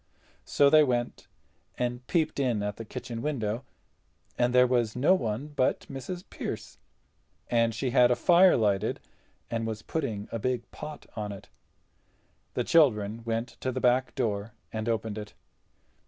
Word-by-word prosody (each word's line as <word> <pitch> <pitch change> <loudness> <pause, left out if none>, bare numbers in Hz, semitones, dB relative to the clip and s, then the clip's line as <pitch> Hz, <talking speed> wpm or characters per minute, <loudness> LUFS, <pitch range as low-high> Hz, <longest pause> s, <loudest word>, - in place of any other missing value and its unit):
So 140 -1 +4
they 155 -1 +8
went 120 -3 -1 0.5
and 125 0 -3
peeped 160 -4 0
in 120 -6 +1
at 105 -1 -3
the 115 - -7
kitchen 115 0 -6
window, 120 -5 -2 0.7
and 120 0 +2
there 125 0 +6
was 120 -3 +1
no 140 +9 +4
one 125 - -2
but 140 -3 +1
Mrs. 140 +7 -7
Pearce, - - -6 0.7
and 115 -2 +2
she 125 +2 -1
had 125 -1 +6
a 125 - +3
fire 180 +5 +6
lighted 105 -2 +1 0.5
and 115 -1 -1
was 110 -1 -5
putting 115 -10 -3
a 115 - -3
big 125 +1 -1
pot 150 -1 -8
on 105 -1 -3
it. 100 - -10 1.1
The - - +1
children 115 -8 +3
went 115 +1 -1
to 130 - -2
the 130 - -3
back 125 +1 +2
door 105 -4 -2 0.2
and 110 +1 -2
opened 110 -2 -2
it. 105 -1 -9
120 Hz, 155 wpm, -28 LUFS, 110-135 Hz, 1.1 s, they